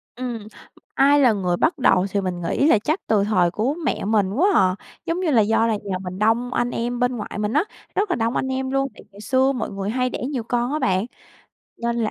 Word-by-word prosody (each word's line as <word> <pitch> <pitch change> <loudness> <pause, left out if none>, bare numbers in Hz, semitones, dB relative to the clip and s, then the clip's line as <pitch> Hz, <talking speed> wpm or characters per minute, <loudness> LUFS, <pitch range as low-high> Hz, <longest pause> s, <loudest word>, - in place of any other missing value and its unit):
Ừm, 240 -4 -5 0.5
ai 280 +2 +4
là 250 -5 +5
người 180 -4 -1
bắt 320 - +1
đầu 190 -8 +3
thì 200 - 0
mình 180 -2 -3
nghĩ 170 - +1
là 270 - +6
chắc 310 - -1
từ 210 -3 +3
thời 185 -5 +2
của 230 +9 0
mẹ - - -1
mình 200 -2 +1
quá 325 - +3
à. 185 -1 +4 0.3
Giống 335 +2 -1
như 355 -4 0
là, 235 -5 +5
do 225 +2 +2
là 225 - +1
nhà 195 -2 -2
mình 185 +1 -6
đông 230 +3 +1
anh 245 0 0
em 240 +1 -2
bên 245 0 0
ngoại 210 - -6
mình 210 +1 -1
á, 300 - +3 0.3
rất 410 0 +1
là 355 - +1
đông 230 +1 -1
anh - - 0
em 265 0 -2
luôn, 270 0 +1
tại - - -15
ngày 200 +1 -13
xưa 260 +4 +2
mọi 255 -3 -3
người 195 0 -4
hay 255 +2 0
đẻ - - -5
nhiều 260 -4 -3
con 240 +3 -1
á 305 - 0
bạn, 190 -6 +1 0.7
nên 235 0 -2
là 225 -2 0
230 Hz, 255 wpm, -22 LUFS, 205-265 Hz, 0.7 s, là